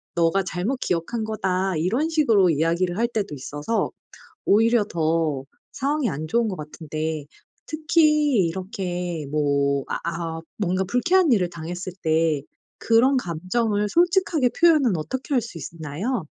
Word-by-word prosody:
"네가 170 +3 +2
잘못 200 +9 -2
기억한 180 +7 -1
거다." 190 -4 -1
이런 235 - 0
식으로 225 - +4
이야기를 170 +4 +1
할 235 +1 +2
때도 205 -10 -3
있어서 145 - -2 0.6
오히려 225 +1 +4
더 160 -6 0 0.3
상황이 280 -2 0
안 155 +3 -4
좋은 235 +3 +2
것 185 - -4
같은데 155 0 -5 0.4
특히 305 - +3
이렇게 180 -3 -4
뭐 140 -2 +1
아 - - -1
아 165 -1 -3 0.2
뭔가 190 -1 0
불쾌한 320 - +3
일을 180 -5 +2
당했을 175 +2 -6
때 160 -3 +2 0.4
그런 245 +4 +4
감정을 205 +4 -1
솔직하게 345 -6 +2
표현은 300 - +5
어떻게 260 - -4
할 250 - +4
수 205 -8 -8
있나요? 165 - -4
185 Hz, 280 characters per minute, -23 LUFS, 165-240 Hz, 0.6 s, 표현은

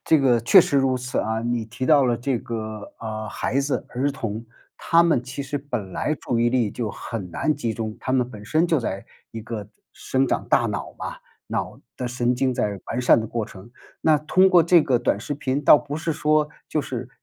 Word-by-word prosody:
这 160 - +4
个 125 -4 +3
确 180 - +7
实 145 - +1
如 135 -1 +2
此 125 +2 -3
啊。 110 0 -1
你 120 -1 -1
提 115 +4 -5
到 145 -3 +5
了 120 -2 +2
这 125 +1 -1
个， 110 -2 -6
呃， 110 -1 -5
孩 135 - -1
子、 140 +1 -1
儿 135 +3 -1
童， 115 -4 -5 0.3
他 170 0 +4
们 165 -8 +2
其 135 +2 -6
实 145 +2 -4
本 110 -10 -5
来 155 - -1
注 120 - -1
意 120 - +4
力 120 -4 +1
就 115 -2 -3
很 100 -7 -6
难 155 - 0
集 120 -5 -2
中。 110 -1 -5
他 130 - -2
们 125 -2 +2
本 105 -4 -11
身 155 +11 +2
就 160 -5 +2
在 100 -3 -4 0.3
一 115 - -7
个 105 -3 -6 0.2
生 135 +1 0
长 - - -1
大 - - +3
脑 - - -4
嘛， - - -5 0.3
脑 - - -4 0.2
的 125 - -3
神 125 0 0
经 130 +1 +1
在 105 -5 -1
完 120 - -2
善 125 -2 +5
的 110 - -4
过 115 -1 -3
程。 105 0 -13 0.3
那 155 -2 +4
通 185 +5 +4
过 175 -3 +6
这 170 0 +5
个 130 -5 +2
短 110 -4 0
视 145 - -4
频， 140 0 -2
倒 150 - +8
不 145 0 -6
是 160 0 -2
说 150 0 +2 0.2
就 155 - 0
是， 125 -2 -5
125 Hz, 240 characters per minute, -23 LUFS, 115-145 Hz, 0.3 s, 倒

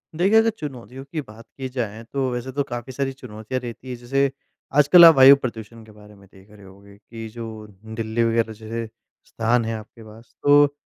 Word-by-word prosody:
देखिए, 195 +7 +3
अगर 225 0 +4
चुनौतियों 135 -2 -8
की 155 - -3
बात 115 -3 -14
की 135 -1 -4
जाए 115 -4 -5
तो 135 -2 0
वैसे 125 +2 -5
तो 140 +2 -1
काफ़ी 120 +1 -6
सारी 135 0 -2
चुनौतियाँ 125 -1 -6
रहती 120 +2 -9
है, 125 - -4
जैसे 135 +3 0 0.5
आजकल 150 +4 +8
आप 165 - +9
वायु 135 +1 +9
प्रदूषण 115 -3 -7
के 110 - -16
बारे 105 0 -17
में 100 -1 -19
देख 95 +1 -19
रहे 105 -2 -16
होगे 100 +1 -17
कि 115 +1 -10
जो 110 -2 -9 0.3
दिल्ली 115 +1 -1
वगैरह 115 -1 0
जैसे 115 +1 -6 0.4
स्थान 115 +1 0
है 115 - -3
आपके 110 +1 -13
पास, 110 +2 -16
तो 145 0 +5
115 Hz, 200 wpm, -22 LUFS, 110-135 Hz, 0.5 s, आप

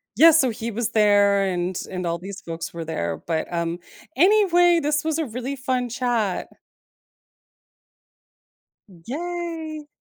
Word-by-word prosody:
yeah, 325 +9 +8
so 285 -5 +4
he 230 +1 -4
was 230 +2 -2
there 205 -2 +4
and 180 -1 -2
and 180 -1 -4
all 170 0 -1
these 195 +3 -9
folks 165 0 -6
were 165 -1 -6
there, 85 - -3
but, 160 0 -2
um, 170 0 -2 0.4
anyway, 350 -1 +5
this 300 0 0
was 320 0 -1
a 320 - 0
really 250 +3 -5
fun 255 -2 -2
chat. 235 -5 -1 2.6
Yay. 325 0 -5
240 Hz, 130 wpm, -23 LUFS, -, 2.6 s, yeah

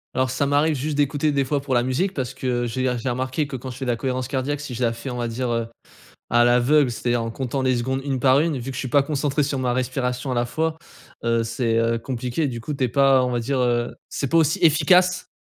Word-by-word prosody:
Alors 130 0 +1
ça 130 +2 0
m'arrive 145 +2 +2
juste 145 +2 -2
d'écouter, 145 +1 +1
des 140 -1 +1
fois, 140 +2 -1
pour 135 -1 -3
la 120 - +4
musique 145 +11 -1
parce 130 -4 -4
que, - - -8 0.2
heu, - - -2
j'ai 130 +3 -3 0.2
j'ai 125 - -2
remarqué 130 +4 -1
que 140 - -6
quand 130 +1 -6
je 125 - -10
fais 135 - -4
de 120 - +1
cohérence 130 0 -2
cardiaque, 140 +1 -2
si 140 -4 -6
je 125 - -2
la 115 -1 +2
fais, 115 +4 -7
on 125 - -4
va 120 -1 -2
dire, 120 +2 -3
heu, 115 -1 -1 0.6
à 120 +1 +5
l'aveugle, 125 +3 +4
c'est-à-dire 120 0 -1
en 115 - -3
comptant 130 +2 -3
les 130 -1 +2
secondes, 130 +3 -1
une 135 -2 -2
par 130 +2 +4
une, 160 -3 0
vu 125 +2 -5
que - - -7
je - - -5
suis 130 - -3
pas 140 +3 +4
concentré 145 0 0
sur 140 -1 -1
ma 125 -1 0
respiration 130 0 -2
à - - 0
la 120 0 0
fois, 160 +4 -2 0.5
heu, 115 0 +1
c'est, 115 0 -1
heu, 115 0 +2
compliqué. 125 +4 -2
Du 120 -2 -6
coup, 150 - -4
tu 140 -2 -1
es - - +1
pas, 135 +1 +4
on - - -2
va 120 -1 -1
dire, 135 +3 -1
heu, 120 -1 0
c'est 140 - -3
pas 165 - +3
aussi 160 +4 +2
efficace. 180 +4 +4
130 Hz, 275 wpm, -23 LUFS, 120-145 Hz, 0.6 s, à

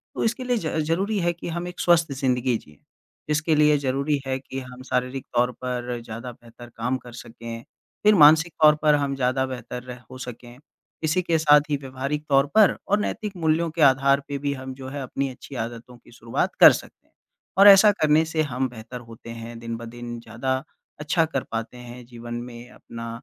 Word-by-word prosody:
तो - - -2
इसके 235 +3 -1
लिए 245 -1 0
ज 160 -5 -3
ज़रूरी 195 +6 0
है 175 -1 +1
कि 170 - -9
हम 175 +1 -4
एक 180 0 -9
स्वस्थ 170 -3 +3
जिंदगी 125 -2 +1
जिएँ, 75 -7 -18 0.5
जिसके 155 +1 +1
लिए 150 0 +4
ज़रूरी 140 +2 -1
है 130 - -1
कि 135 0 -7
हम 125 0 -10
शारीरिक 125 +1 -2
तौर 125 +1 +3
पर 125 -1 -3
ज़्यादा 120 +2 -7
बेहतर 120 0 -15
काम 125 +3 -1
कर 125 -1 -13
सकें, 115 0 -9 0.4
फिर 210 0 +6
मानसिक 160 0 +6
तौर 150 0 +8
पर 150 -1 +4
हम 140 -1 -2
ज़्यादा 130 0 0
बेहतर 125 -1 -7
रह 125 -1 -9
हो 130 - -9
सकें। 120 -1 -9 0.5
इसी 160 +4 +1
के 170 -2 +1
साथ 150 -1 +6
ही 145 - +1
व्यवहारिक 135 +2 -4
तौर 140 0 +4
पर 215 -3 +6
और 205 +1 +2
नैतिक 210 -1 -4
मूल्यों 165 0 +1
के 160 0 -4
आधार 140 0 +5
पे 140 - -3
भी 140 - +1
हम 130 -1 -7
जो 130 0 -9
है 140 +1 -5
अपनी 135 +1 -3
अच्छी 130 +2 -11
आदतों 120 +1 -9
की 120 - -21
शुरुआत 115 -1 -3
कर - - +10
सकते - - -8
हैं। - - -39 0.4
और 200 +1 +8
ऐसा 200 +1 +9
करने 155 +1 +4
से 160 0 -1
हम 130 -3 -1
बेहतर 120 +1 -9
होते 115 +1 -12
हैं, 115 0 -8
दिन-ब-दिन 115 +1 -7
ज़्यादा 130 +3 -3 0.4
अच्छा 155 +2 +1
कर 140 -5 -3
पाते 115 +2 -4
हैं, 125 0 -11
जीवन 120 -1 -9
में 120 0 -8
अपना 115 -1 -9
130 Hz, 200 wpm, -24 LUFS, 120-155 Hz, 0.5 s, कर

